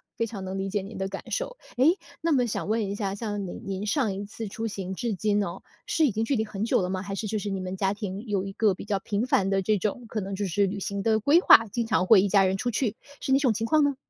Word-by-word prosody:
非 230 Hz, -, -1 dB
常 200 Hz, -4 st, -7 dB
能 190 Hz, +1 st, -4 dB
理 195 Hz, -, -2 dB
解 200 Hz, 0 st, -1 dB
您 200 Hz, -, -9 dB
的 190 Hz, 0 st, -2 dB
感 195 Hz, 0 st, -6 dB
受。 -, -, -2 dB, 0.2 s
诶， 260 Hz, +6 st, +5 dB, 0.3 s
那 330 Hz, 0 st, +1 dB
么 255 Hz, -4 st, +3 dB
想 215 Hz, -, -3 dB
问 220 Hz, -2 st, +1 dB
一 200 Hz, -, -3 dB
下， 200 Hz, -2 st, -2 dB
像 205 Hz, -2 st, -3 dB
您 -, -, -7 dB
您 195 Hz, +1 st, -3 dB
上 235 Hz, -6 st, +1 dB
一 200 Hz, -, -4 dB
次 220 Hz, +2 st, -6 dB
出 225 Hz, +3 st, -4 dB
行 190 Hz, -2 st, -5 dB
至 225 Hz, 0 st, -2 dB
今 205 Hz, +1 st, +1 dB
哦， 175 Hz, 0 st, -5 dB, 0.3 s
是 320 Hz, -, +3 dB
已 255 Hz, -, +2 dB
经 220 Hz, +3 st, -1 dB
距 275 Hz, -, 0 dB
离 220 Hz, -2 st, 0 dB
很 210 Hz, -1 st, -4 dB
久 230 Hz, -, +2 dB
了 180 Hz, -, -2 dB
吗？ 185 Hz, 0 st, -2 dB
还 195 Hz, 0 st, -5 dB
是 215 Hz, -, -4 dB
就 215 Hz, 0 st, -1 dB
是 205 Hz, -, -4 dB
你 195 Hz, -1 st, -2 dB
们 185 Hz, 0 st, -4 dB
家 195 Hz, +1 st, 0 dB
庭， 200 Hz, 0 st, -5 dB
有 200 Hz, -2 st, 0 dB
一 195 Hz, -, -6 dB
个 210 Hz, -3 st, +2 dB
比 -, -, -9 dB
较 205 Hz, -2 st, 0 dB
频 205 Hz, +4 st, -1 dB
繁 195 Hz, -6 st, +2 dB
的 195 Hz, 0 st, +2 dB
这 215 Hz, +3 st, +2 dB
种 220 Hz, +4 st, -2 dB
可 215 Hz, -1 st, -3 dB
能 195 Hz, +1 st, -4 dB
就 200 Hz, +1 st, -2 dB
是 195 Hz, +2 st, +1 dB
旅 200 Hz, +2 st, -4 dB
行 200 Hz, +1 st, -3 dB
的 220 Hz, +1 st, +2 dB
规 285 Hz, +10 st, +5 dB
划， 225 Hz, -10 st, +8 dB
经 235 Hz, 0 st, -1 dB
常 185 Hz, -5 st, +2 dB
会 195 Hz, -2 st, +7 dB
一 200 Hz, -, +1 dB
家 195 Hz, 0 st, +5 dB
人 190 Hz, +1 st, +1 dB
出 245 Hz, -, -1 dB
去？ 225 Hz, -2 st, -1 dB, 0.3 s
是 265 Hz, -, -2 dB
哪 270 Hz, -, +5 dB
种 265 Hz, -4 st, +3 dB
情 225 Hz, +2 st, -2 dB
况 305 Hz, +5 st, +4 dB
呢？ 285 Hz, -1 st, +2 dB
205 Hz, 330 characters per minute, -26 LUFS, 195-225 Hz, 0.3 s, 划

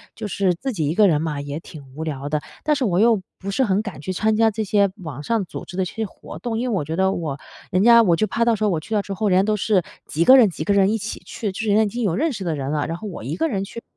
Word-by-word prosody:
就 220 Hz, -, -5 dB
是 195 Hz, -2 st, +1 dB
自 265 Hz, +9 st, -4 dB
己 155 Hz, -8 st, -1 dB
一 155 Hz, -, 0 dB
个 210 Hz, 0 st, +6 dB
人 155 Hz, -4 st, +2 dB
嘛， 155 Hz, -3 st, -2 dB
也 145 Hz, +1 st, -5 dB
挺 140 Hz, -6 st, -13 dB
无 160 Hz, -, -4 dB
聊 145 Hz, -3 st, -4 dB
的。 150 Hz, 0 st, -1 dB, 0.2 s
但 300 Hz, -, +2 dB
是 275 Hz, -3 st, 0 dB
我 180 Hz, -3 st, +1 dB
又 225 Hz, -2 st, +4 dB, 0.2 s
不 195 Hz, -, -6 dB
是 230 Hz, +7 st, +1 dB
很 200 Hz, -3 st, +1 dB
敢 190 Hz, -10 st, -7 dB
去 185 Hz, +5 st, -3 dB
参 220 Hz, +3 st, +1 dB
加 225 Hz, 0 st, +4 dB
这 215 Hz, +1 st, -2 dB
些 200 Hz, -1 st, +2 dB
网 150 Hz, -5 st, -7 dB
上 225 Hz, +2 st, 0 dB
组 -, -, -8 dB
织 180 Hz, -, -10 dB
的 190 Hz, -, +2 dB
这 -, -, -7 dB
些 225 Hz, -1 st, -2 dB
活 180 Hz, -, -11 dB
动， 225 Hz, +4 st, -3 dB
因 250 Hz, +1 st, -1 dB
为 225 Hz, -, 0 dB
我 175 Hz, -, 0 dB
觉 160 Hz, +2 st, -3 dB
得 190 Hz, +2 st, +2 dB
我 150 Hz, -6 st, -4 dB, 0.3 s
人 185 Hz, 0 st, +2 dB
家 235 Hz, 0 st, +7 dB
我 175 Hz, -6 st, +4 dB
就 215 Hz, +6 st, 0 dB
怕 230 Hz, +4 st, 0 dB
到 235 Hz, -1 st, +3 dB
时 215 Hz, -, -3 dB
候 210 Hz, -, +3 dB
我 170 Hz, -5 st, 0 dB
去 220 Hz, +8 st, -7 dB
了 205 Hz, -, +2 dB
之 200 Hz, -, -6 dB
后， 210 Hz, +1 st, 0 dB
人 185 Hz, 0 st, +4 dB
家 190 Hz, -, +3 dB
都 215 Hz, +1 st, +1 dB
是 205 Hz, -2 st, +2 dB, 0.2 s
几 160 Hz, -, 0 dB
个 260 Hz, +8 st, +8 dB
人 225 Hz, -6 st, +6 dB
几 155 Hz, -, -5 dB
个 180 Hz, -, 0 dB
人 200 Hz, 0 st, +4 dB
一 225 Hz, -, +1 dB
起 215 Hz, +3 st, -5 dB
去， 210 Hz, -3 st, -4 dB
就 190 Hz, -, -8 dB
是 220 Hz, -, -1 dB
人 205 Hz, -, +4 dB
家 220 Hz, -, +5 dB
已 215 Hz, -, 0 dB
经 240 Hz, +4 st, -3 dB
有 185 Hz, -6 st, +1 dB
认 315 Hz, -, +1 dB
识 200 Hz, -5 st, -5 dB
的 165 Hz, -3 st, -1 dB
人 135 Hz, 0 st, -3 dB
了， 150 Hz, -1 st, 0 dB
然 165 Hz, -, -4 dB
后 215 Hz, -, -7 dB
我 180 Hz, -, -7 dB
一 140 Hz, +7 st, -3 dB
个 325 Hz, -, 0 dB
人 200 Hz, -10 st, -2 dB
去， 230 Hz, +4 st, -8 dB
195 Hz, 370 characters per minute, -22 LUFS, 165-220 Hz, 0.3 s, 个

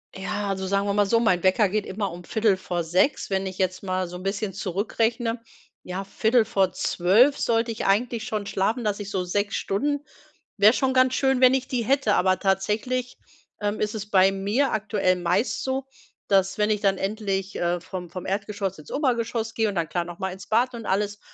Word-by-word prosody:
Ja, 200 Hz, +2 st, -3 dB
also 190 Hz, -1 st, -2 dB
sagen 200 Hz, +1 st, 0 dB
wir 200 Hz, -, +1 dB
mal 205 Hz, 0 st, +3 dB
so, 230 Hz, +3 st, +3 dB
mein 185 Hz, -6 st, +2 dB
Wecker 190 Hz, +2 st, +4 dB
geht 210 Hz, +1 st, -1 dB
immer 200 Hz, 0 st, -3 dB
um 175 Hz, +1 st, -9 dB
05:45, 185 Hz, -, 0 dB
wenn 195 Hz, 0 st, 0 dB
ich 185 Hz, -1 st, -6 dB
jetzt 185 Hz, 0 st, -1 dB
mal 185 Hz, -1 st, -1 dB
so 180 Hz, -, -9 dB
'n 180 Hz, -, -8 dB
bisschen 195 Hz, 0 st, -2 dB
zurückrechne. 225 Hz, +5 st, -1 dB, 0.4 s
Ja 185 Hz, +2 st, -4 dB
23:45 220 Hz, +2 st, +2 dB
sollte 230 Hz, 0 st, +1 dB
ich 220 Hz, -, -4 dB
eigentlich 225 Hz, +3 st, +1 dB
schon 215 Hz, -2 st, -3 dB
schlafen, 215 Hz, +6 st, -1 dB
dass 210 Hz, -1 st, -1 dB
ich 200 Hz, -1 st, -6 dB
so 190 Hz, -3 st, -1 dB
6 200 Hz, +3 st, -1 dB
Stunden 285 Hz, +8 st, -1 dB, 0.5 s
wäre 210 Hz, +4 st, +6 dB
schon 260 Hz, 0 st, +1 dB
ganz 255 Hz, 0 st, +4 dB
schön, 265 Hz, -1 st, +2 dB
wenn 255 Hz, 0 st, +7 dB
ich 265 Hz, -1 st, 0 dB
die 245 Hz, -3 st, -1 dB
hätte. 265 Hz, -3 st, +2 dB
Aber 185 Hz, 0 st, +2 dB
tatsächlich, 215 Hz, +6 st, -1 dB, 0.4 s
ähm, 205 Hz, +1 st, -1 dB
ist 210 Hz, +1 st, -1 dB
es 210 Hz, 0 st, -6 dB
bei 190 Hz, -1 st, +5 dB
mir 205 Hz, +8 st, 0 dB
aktuell 205 Hz, -3 st, +1 dB
meist 180 Hz, +6 st, 0 dB
so, 265 Hz, 0 st, -2 dB, 0.4 s
dass 195 Hz, 0 st, +2 dB
wenn 210 Hz, 0 st, +2 dB
ich 210 Hz, 0 st, 0 dB
dann 195 Hz, -1 st, +2 dB
endlich, 195 Hz, -1 st, -2 dB
äh, 175 Hz, 0 st, 0 dB
vom 180 Hz, -1 st, -7 dB
vom 185 Hz, +1 st, -7 dB
Erdgeschoss 200 Hz, -1 st, -3 dB
ins 150 Hz, -, -12 dB
Obergeschoss 235 Hz, -5 st, -1 dB
gehe 225 Hz, -2 st, +1 dB
und 200 Hz, -, -5 dB
dann, 170 Hz, -3 st, 0 dB
klar, 175 Hz, -, -1 dB
noch 175 Hz, 0 st, -10 dB
mal 190 Hz, -1 st, -3 dB
ins 190 Hz, +2 st, -11 dB
Bad 245 Hz, +3 st, +2 dB
und 230 Hz, -3 st, -7 dB
alles 205 Hz, +1 st, -1 dB
205 Hz, 200 wpm, -25 LUFS, 190-230 Hz, 0.5 s, wenn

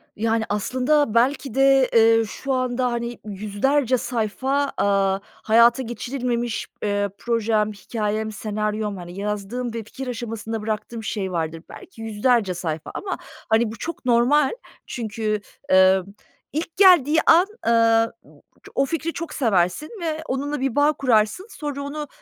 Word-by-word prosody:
Yani 225 Hz, +1 st, 0 dB
aslında 255 Hz, +5 st, +1 dB
belki 255 Hz, +2 st, +1 dB
de, 270 Hz, -1 st, +5 dB
eee, 225 Hz, 0 st, +5 dB
şu 270 Hz, +5 st, -4 dB
anda 255 Hz, -1 st, 0 dB
hani 235 Hz, 0 st, -4 dB
100'lerce 215 Hz, +6 st, 0 dB
sayfa, 260 Hz, +5 st, -1 dB
aaa, 195 Hz, -1 st, +2 dB
hayata 235 Hz, +4 st, +3 dB
geçirilmemiş, 240 Hz, -1 st, -3 dB, 0.2 s
eee, 205 Hz, -1 st, 0 dB
projem, 220 Hz, -2 st, 0 dB
hikâyem, 215 Hz, +1 st, -3 dB
senaryom 210 Hz, -1 st, -3 dB
hani 175 Hz, +2 st, -8 dB
yazdığım 210 Hz, +4 st, -3 dB
ve 230 Hz, -1 st, -4 dB
fikir 260 Hz, +4 st, -8 dB
aşamasında 225 Hz, -2 st, -4 dB
bıraktığım 220 Hz, +1 st, -4 dB
şey 195 Hz, -4 st, -3 dB
vardır. 165 Hz, -1 st, -3 dB
Belki 225 Hz, -, -12 dB
100'lerce 220 Hz, -2 st, +1 dB
sayfa 160 Hz, -3 st, -4 dB
ama 395 Hz, -, -3 dB, 0.3 s
hani 220 Hz, 0 st, +3 dB
bu 225 Hz, -, -9 dB
çok 335 Hz, +3 st, -6 dB
normal 255 Hz, +4 st, +4 dB, 0.4 s
çünkü, 215 Hz, -2 st, -3 dB, 0.3 s
emm, 190 Hz, 0 st, +5 dB, 0.5 s
ilk 320 Hz, +2 st, -4 dB
geldiği 345 Hz, -6 st, +6 dB
an, 350 Hz, +4 st, +6 dB, 0.2 s
ııı, 230 Hz, 0 st, +4 dB
b -, -, -19 dB, 0.3 s
ço -, -, -14 dB
o 275 Hz, -, +3 dB
fikri 330 Hz, +3 st, -3 dB
çok 330 Hz, -2 st, -6 dB
seversin 200 Hz, -, +1 dB
ve 315 Hz, -2 st, -2 dB
onunla 285 Hz, +2 st, -2 dB
bir 265 Hz, -3 st, -1 dB
bağ 295 Hz, +1 st, +4 dB
kurarsın 250 Hz, -, +1 dB
sonra 290 Hz, -7 st, -5 dB
onu 295 Hz, +1 st, -5 dB
230 Hz, 140 wpm, -23 LUFS, 210-270 Hz, 0.5 s, geldiği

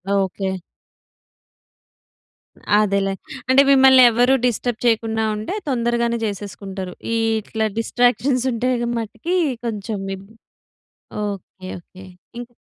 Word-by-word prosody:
Okay. 190 Hz, -1 st, -1 dB, 2.2 s
అదేలే. 200 Hz, -2 st, +1 dB, 0.4 s
అంటే 260 Hz, +1 st, +7 dB
మిమ్మల్ని 265 Hz, -1 st, +7 dB
ఎవ్వ‌రు 245 Hz, +3 st, +3 dB
డిస్టర్బ్ 245 Hz, 0 st, -1 dB
చేయకుండా 225 Hz, -1 st, +1 dB
ఉంటే, 215 Hz, -, -4 dB, 0.2 s
తొందరగానే 235 Hz, -2 st, 0 dB
జేసేసుకుంటారు. 195 Hz, -2 st, -5 dB, 0.2 s
ఈ -, -, +1 dB, 0.3 s
ఇట్లా 220 Hz, +1 st, -2 dB
డిస్ట్రాక్షన్స్ 245 Hz, +2 st, +1 dB
ఉంటే 245 Hz, +2 st, 0 dB, 0.3 s
మటికి, 230 Hz, -, -3 dB, 0.3 s
కొంచెం 215 Hz, -2 st, -3 dB, 0.2 s
ఇబ్ 195 Hz, +1 st, -14 dB, 1.0 s
ఓకె. 190 Hz, -2 st, -7 dB
ఓకె. 185 Hz, +2 st, -15 dB, 0.3 s
ఇంక్ 245 Hz, 0 st, -8 dB
225 Hz, 95 wpm, -21 LUFS, 200-245 Hz, 2.2 s, అంటే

